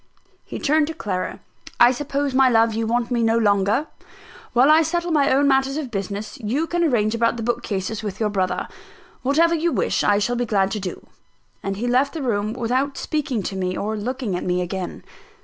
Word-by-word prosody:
He - - -7
turned 305 +1 +2
to 325 - -5
Clara. 185 - -4 0.4
"I 240 +1 +7
suppose, 280 +1 -2
my 265 0 +5
love, 225 -1 +3
you 225 0 -1
want 235 +1 0
me 240 -1 +1
no 225 0 +3
longer. 205 +4 +2 0.7
While 255 +5 +5
I 315 +1 +6
settle 345 +2 -1
my 290 -3 +3
own 280 +2 +3
matters 270 +1 +2
of 280 -6 -4
business, 200 +2 -5
you 255 +8 -1
can 345 +1 -1
arrange 225 -8 +2
about 230 0 +1
the 230 - -4
bookcases 220 -3 -2
with 205 -3 -5
your 215 -2 +1
brother. 190 -2 -1 0.5
Whatever 320 +6 +3
you 335 +1 +1
wish, - - 0
I 205 - +3
shall 225 +4 0
be 245 - 0
glad 195 -2 +1
to 215 - -2
do." 190 -2 -6 0.6
And 195 0 -3
he 230 - -3
left 260 +5 +1
the 310 - -3
room 215 -3 -1
without 255 +4 -1
speaking 275 -8 -2
to 195 - -4
me, 185 -1 -2
or 215 +2 -2
looking 235 -1 -3
at 180 - -3
me 180 0 0
again. 185 0 -5
235 Hz, 205 wpm, -22 LUFS, 205-275 Hz, 0.7 s, I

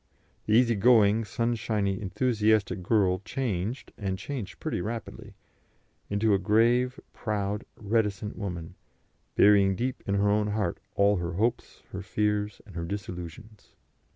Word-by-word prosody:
The 105 - +2
easy 120 +1 +5
going, 110 0 +4
sunshiny, 105 -3 -1
enthusiastic 110 -1 +1
girl 95 -2 +2
changed 115 -1 -3
and 95 -2 -2
changed 100 -4 -6
pretty - - -2
rapidly 115 +4 -6 0.7
into 105 +1 +2
a 100 - +3
grave, 120 +6 +2
proud, 105 -2 -2
reticent 105 -1 -1
woman, 90 -4 -5 0.6
burying 100 -2 +5
deep 125 +5 -2
in 100 - +1
her 100 +1 +2
own 105 +1 +2
heart 105 -4 -1 0.2
all 100 0 +4
her 85 0 -3
hopes, 110 +6 -2
her 95 - -5
fears, 105 +1 -1
and 100 -5 -14
her 85 - -3
disillusions. 100 +2 -8
105 Hz, 130 wpm, -28 LUFS, 95-110 Hz, 0.7 s, easy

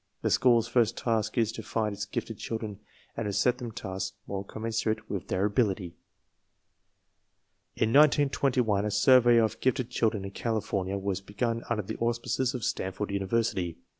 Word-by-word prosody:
The - - +1
school's 120 -3 +4
first 115 -1 +2
task 110 -2 -1
is 115 -2 +2
to - - -7
find 110 -2 -2
its 105 +1 -4
gifted 110 +2 -4
i - - -25
children 110 -3 -5 0.4
and 115 - -3
to 100 - -2
set 125 +5 +2
them 120 -2 -5
tasks 95 -2 -5
more 100 -1 -4
commensurate 110 +1 -2
I - - -17
with 95 - -4
their 95 +2 0
ability. 100 -5 0 1.8
In 110 - +1
1921 135 -7 +3
a 105 - -1
survey 120 +3 +5
of 110 -1 +2
gifted 130 -1 0
children 110 -5 0
in 100 - -6
California 100 -3 -2
was 100 -1 -2
begun 115 +4 -2
under 110 -3 0
the 110 +4 -6
auspices 120 +3 -1
of 125 - -4
Stanford 95 +2 -2
University. 95 -3 -1
110 Hz, 165 wpm, -28 LUFS, 100-120 Hz, 1.8 s, survey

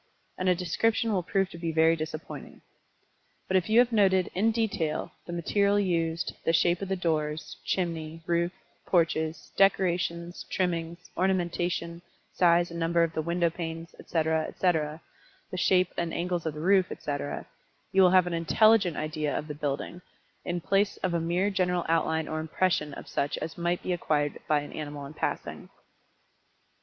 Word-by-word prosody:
And 185 0 0
a 180 - +4
description 220 +6 +1
will 185 - +1
prove 190 +2 0
to 170 - -9
be 165 -1 -2
very 160 +1 +4
disappointing. 155 0 -7 0.9
But 190 - 0
if 185 +2 +2
you 220 - +4
have 245 0 +6
noted, 190 -4 +3
in 210 +5 +2
detail, 200 -8 -1 0.2
the - - -5
material 200 +4 +2
used, 170 -3 0
the 165 - +2
shape 170 +2 +3
of 195 - -4
the 190 - +1
doors, 155 -3 -2
chimney, 165 -3 -2
roof, 170 +1 +1 0.4
porches, 160 -2 0
decorations, 175 -3 +1
trimmings, 170 -1 -2
ornamentation, 175 -2 -1 0.3
size 175 -1 +3
and 170 - -5
number 170 +1 +2
of 165 -1 -1
the 160 - -1
window 170 +1 +1
panes 165 0 -6
etc., 160 -1 0
etc., 160 -3 0 0.5
the 185 - -4
shape 185 +1 +3
and 170 -1 -2
angles 175 -1 -1
of 155 - -3
the 150 - -6
roof, 190 +1 +3
etc., 145 -1 -4 0.5
you 190 - +4
will 185 - +7
have 185 0 +5
an 175 - -3
intelligent 190 +2 +4
idea 155 -1 -2
of 150 - -4
the 150 - -4
building, 145 +4 -4 0.4
in 175 - -2
the 175 - -6
place 200 +1 +2
of 185 -2 0
a 170 - +1
mere 175 +5 +1
general 180 -2 0
outline 160 -1 +1
or 155 - -3
impression 160 -1 0
of - - -9
such 140 - -1
as 160 +1 -5
might 175 +1 -1
be 185 - 0
acquired 150 -4 0
by 150 -1 +3
an 145 - -9
animal 145 -2 -6
in 140 - -9
passing. - - -4
170 Hz, 170 wpm, -28 LUFS, 160-185 Hz, 0.9 s, will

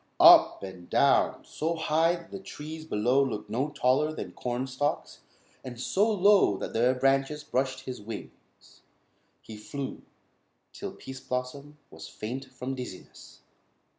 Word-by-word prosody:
Up - - +8
and 95 -2 -9
down, - - +3
so 165 +2 -2
high 160 +1 +2
that 170 -1 -12
the 195 - -6
trees 155 -3 -8
below 125 +1 +2
looked 110 -6 -4
no 130 +6 0
taller 140 +2 +2
than 155 - -6
corn 125 +1 -3
stalks, 135 +3 -3 0.4
and 125 -2 -8
so 205 - +2
low 200 - +4
that - - -5
their 125 +3 +3
branches 135 +3 +1
brushed 130 -2 -1
his 125 -3 -7
wings, 105 0 -7 1.1
he 110 - -10
flew, 135 +5 -6 0.7
till - - -6
Pease 130 0 -9
Blossom 140 +4 -5
was 80 0 -10
faint 130 +5 -6
from 130 0 -6
dizziness. 125 -8 -10
130 Hz, 140 wpm, -28 LUFS, 125-150 Hz, 1.1 s, Up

